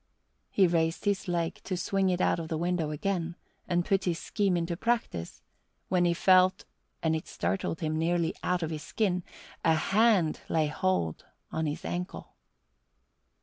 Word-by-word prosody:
He 195 - +4
raised 165 0 +1
his 200 0 0
leg 170 -2 -1
to 185 - -3
swing 195 +1 +1
it 180 -1 0
out - - +2
of 165 - -4
the 160 - -2
window 170 -1 0
again 170 +2 -2 0.3
and 175 0 +1
put 195 -1 +1
his 175 -3 0
scheme 195 -2 0
into 170 0 -1
practice, 230 - -2 0.5
when 180 -1 +3
he 170 0 +2
felt 185 +1 +4 0.4
and 160 -1 +2
it 160 - -4
startled 95 - -2
him 155 -1 -1
nearly 170 0 +1
out 180 -1 0
of 160 - -2
his 155 -1 -4
skin 180 -3 0 0.4
a 160 -1 +4
hand 195 -1 +3
lay 160 -1 +2
hold 150 - -1 0.3
on 160 -1 -1
his 150 - -4
ankle. 180 +1 -5
175 Hz, 165 wpm, -29 LUFS, 160-185 Hz, 0.5 s, He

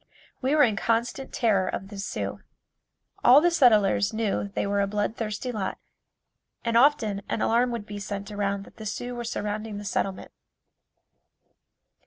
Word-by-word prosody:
We 270 +3 +2
were 300 - +6
in 220 -6 +2
constant 235 +4 -1
terror 200 -6 +2
of 195 +1 -4
the 205 -2 -8
Sioux. 200 - -4 0.8
All 255 +4 +8
the 350 +3 +3
settlers 215 - +4
knew 215 -2 -1
they 200 - -3
were 200 0 +1
a 200 - +1
blood 210 +2 -1
thirsty 225 +2 -3
lot 210 -5 -3 0.9
and 230 0 0
often 230 -6 +3
an - - -1
alarm 240 +2 +3
would 235 -3 -4
be 205 -1 -7
sent 200 0 -5
around 200 -1 -1
that - - -17
the 220 - -6
Sioux 245 +4 -4
were 240 0 -5
surrounding 215 -2 -4
the 205 - -7
settlement. 190 -1 -2
215 Hz, 165 wpm, -26 LUFS, 200-240 Hz, 0.9 s, All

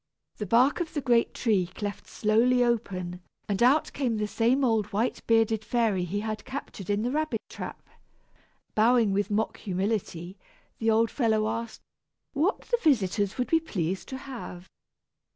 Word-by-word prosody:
The 210 - -4
bark 250 - +4
of 340 -2 -4
the - - +1
great 240 -3 +3
tree 205 -7 +1
cleft 205 -1 -5
slowly 235 +4 +3
open, 185 -7 -2 0.3
and 200 -1 -1
out 270 +6 +4
came 245 -6 -1
the 210 - 0
same 235 +6 +1
old 225 -4 +2
white 225 +5 -1
bearded 225 -1 +3
fairy 215 -6 +1
he 200 +4 -2
had 215 -1 -4
captured 260 -7 -7
in 205 +1 +1
the 245 - 0
rabbit 305 -6 -1
trap. - - -8 0.9
Bowing 225 -1 +4
with 205 +1 0
mock 215 +1 -1
humility, 190 -2 -3 0.4
the 225 - +1
old 225 +1 +3
fellow 220 -4 +1
asked 230 +1 -4 0.5
what 320 +9 0
his 480 -1 0
visitors 205 - +2
would 250 - -1
be 325 - +5
pleased 190 - -3
to 265 - -4
have. 235 -9 -8
225 Hz, 160 wpm, -27 LUFS, 205-250 Hz, 0.9 s, be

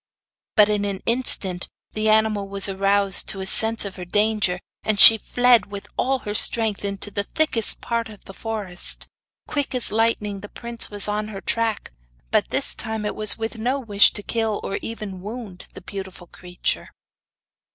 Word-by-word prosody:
But 210 -2 +5
in 210 -1 -2
an 200 -2 -5
instant 205 -7 +3 0.2
the 215 0 -2
animal 215 -2 +1
was 195 0 0
aroused 195 0 +1
to 195 - -2
a 190 - -5
sense 220 +2 +5
of 200 -1 -8
her 180 - -8
danger, 205 -1 0 0.2
and 215 -2 -3
she 225 - +11
fled 245 -1 +2
with 200 0 -9
all 270 +1 -1
her 205 - -4
strength 220 -1 +2
into 200 0 -5
the 200 - -2
thickest 245 -7 -2
part 230 -1 -4
of 210 -2 -15
the 195 - -12
forest. 210 -5 0 0.4
Quick 285 -3 -3
as 250 - +5
lightning 215 -2 -1
the 205 +1 -12
prince 235 -1 -2
was 205 -1 +1
on 210 +1 -3
her 205 -2 -8
track, 225 - -3 0.4
but - - 0
this - - +3
time 220 -1 -4
it 210 - -3
was 215 -1 +4
with 225 0 -6
no 255 +5 -2
wish 205 -5 +3
to 205 - -5
kill 225 -2 -3
or 195 - -5
even 210 -5 -8
wound 210 -3 -9
the - - -11
beautiful 190 -1 -10
creature. 180 +1 -4
210 Hz, 180 wpm, -21 LUFS, 195-225 Hz, 0.4 s, she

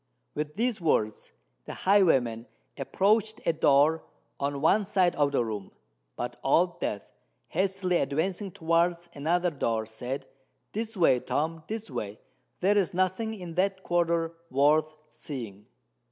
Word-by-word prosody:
With 150 0 -4
these 230 -2 0
words 110 -10 0 0.3
the - - -6
highwayman 135 - +3 0.3
approached 210 - +1
a 165 - +3
door 150 +1 +4 0.4
on 140 0 -1
one 180 +8 +4
side 190 -3 +2
of 145 -1 +2
the 125 -4 +1
room; 105 -3 -5 0.5
but - - -5
Old - - +2
Death, - - -2 0.5
hastily 185 0 0
advancing 175 +9 -1
towards 170 +1 0
another 175 +5 +1
door, 115 -6 -1
said, 125 +5 -5 0.5
"This 225 0 -4
way, 165 -8 +4
Tom—this 165 - -3
way: 105 -4 -5 0.4
there 205 +3 +4
is 180 -3 -1
nothing 185 +5 0
in 180 -5 -8
that 190 +2 0
quarter—worth 165 -3 +1 0.2
seeing." 110 -8 -8
165 Hz, 125 wpm, -28 LUFS, 140-190 Hz, 0.5 s, door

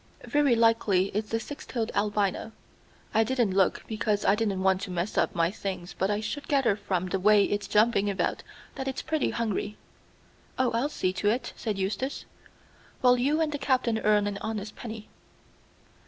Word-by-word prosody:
Very 290 -4 +3
likely 225 -5 +3
it's 210 +1 -3
the 225 - 0
six 290 +6 -8
toed 230 -3 -3
albino. 205 +1 0 0.6
I 220 0 +4
didn't 240 -3 +1
look, 190 -1 +2
because 215 -2 -1
I - - +5
didn't 205 -3 -1
want 190 0 +3
to 200 - -5
mess 180 +3 -2
up - - +1
my 170 0 +2
things 190 -3 -5
but 190 - 0
I 205 0 0
should 275 +7 -5
gather 270 -8 +3
from 185 -3 -2
the 195 - -1
way 205 +1 +5
it's 205 -1 -2
jumping 210 -1 +3
about 200 - -1 0.3
that 265 - -5
it's 265 - -3
pretty 315 -1 0
hungry." 215 -2 -2 0.8
"Oh, 255 -2 +2
I'll 235 +6 0
see 185 -10 -1
to 205 +2 +1
it," 240 +5 -1
said 215 -4 -3
Eustace, 200 +8 -2 0.8
"while 250 -1 +6
you 290 +6 +1
and 310 -1 +1
the 290 - -3
Captain 255 -4 +1
earn 210 -1 +3
an 205 -1 -3
honest 215 -1 -4
penny." 220 -2 -8
215 Hz, 185 wpm, -27 LUFS, 200-240 Hz, 0.8 s, while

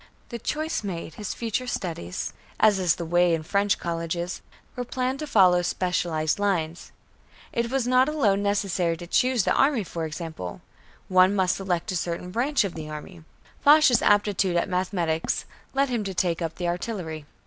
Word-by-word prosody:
The 235 - -5
choice 310 +3 -2
made, 170 -5 -5
his 210 +3 -5
future 235 +2 -2
studies, 160 - -4 0.3
as 210 -3 +5
is 180 -4 +2
the 170 - -5
way 175 0 +3
in 160 - -5
French 200 +4 +1
colleges, 170 +1 -3 0.3
were 250 - -3
planned 255 +2 -2
to 305 - -4
follow 185 -7 +5
specialized 175 -2 0
lines. 175 -5 -1 0.6
It 235 0 0
was 265 -1 0
not 255 +2 +4
alone 210 -10 +2
necessary 195 -4 0
to 175 - -8
choose 250 +5 +2
the - - +2
army, 270 -5 +3
for 165 -2 -4
example, 155 - -6 0.5
one 185 +1 +5
must 185 -2 +2
select 190 0 -2
a - - -3
certain 175 +1 -3
branch 255 +6 +1
of 195 -4 -3
the 155 -1 -7
army. 160 +3 -9 0.4
Foch's 290 -4 +6
aptitude 205 -3 +2
at 170 - +1
mathematics 180 -3 -1 0.3
led 275 0 +2
him 235 -4 -1
to 190 -1 -4
take 175 -1 0
up 165 -1 -3
the 175 - -3
artillery. 175 -4 -4
185 Hz, 170 wpm, -25 LUFS, 170-225 Hz, 0.6 s, Foch's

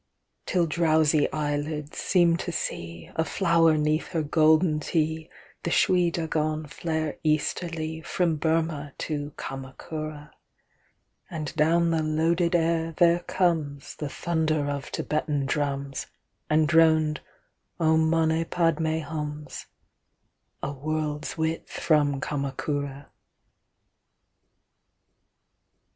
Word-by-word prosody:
Till 180 -2 +2
drowsy 155 -2 +2
eyelids 150 0 -2
seem 175 -3 +3
to 175 - -4
seeA 85 - -3
flower 165 -2 +3
'neath 150 +1 +1
her 160 -2 +1
golden 155 +1 +3
hteeThe 160 0 -1 0.4
Shwe 175 0 +3
Dagon 155 -2 -1
flare 155 +1 -3
easterlyFrom 160 +1 -1
Burmah 160 -3 0
to 145 -2 -3
Kamakura, 150 +3 -6 1.0
And 155 -2 -5
down 165 +2 +3
the 165 -1 +1
loaded 165 +3 +1
air 165 -1 +1
there 170 0 +5
comesThe 160 -6 -1
thunder 155 -2 0
of 140 0 -4
Thibetan 150 -2 -1
drums, 140 -1 -2 0.4
And 155 0 +3
droned—"Om 160 0 +1
mane 160 0 +2
padme 160 -1 +1
hums"—A 150 -2 -9
world's 150 +2 -3
width 160 +1 -2
from 145 -3 +2
Kamakura. 140 0 -3
155 Hz, 90 wpm, -26 LUFS, 150-165 Hz, 1.0 s, there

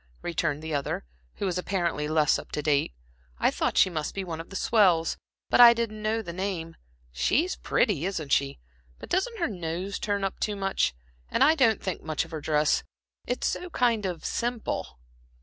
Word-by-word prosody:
returned 160 -3 -1
the 160 -1 -4
other, 140 - -2 0.3
who - - -3
was 180 -1 -1
apparently 175 -5 -1
less 155 -1 +3
up - - -11
to 150 - -3
date. 145 - +2 0.5
"I - - +2
thought - - -1
she - - +7
must 155 -5 -4
be 195 - -2
one 165 -3 -5
of 165 - -13
the 195 - -9
swells, 185 -7 +3 0.3
but - - +5
I 235 -1 +10
didn't 220 -2 -3
know 220 +1 0
the 170 -3 -6
name. 175 -3 -3 0.4
She's 275 - +1
pretty 185 - +1
isn't 160 -8 -4
she? 140 0 +2 0.4
but - - -11
doesn't 455 +6 0
her 340 - 0
nose 180 0 -4
turn 205 -1 -1
up 195 - -2
too 210 - -1
much? 195 - 0 0.3
and - - +3
I 310 - +6
don't 240 -8 +2
think 185 -3 -3
much 155 0 -2
of 165 - -16
her 160 -2 -5
dress, 150 0 +2 0.5
it's - - -1
so 360 - -2
kind 230 - +1
of 175 -3 -5
simple." 235 - -3
185 Hz, 195 wpm, -27 LUFS, 160-215 Hz, 0.5 s, I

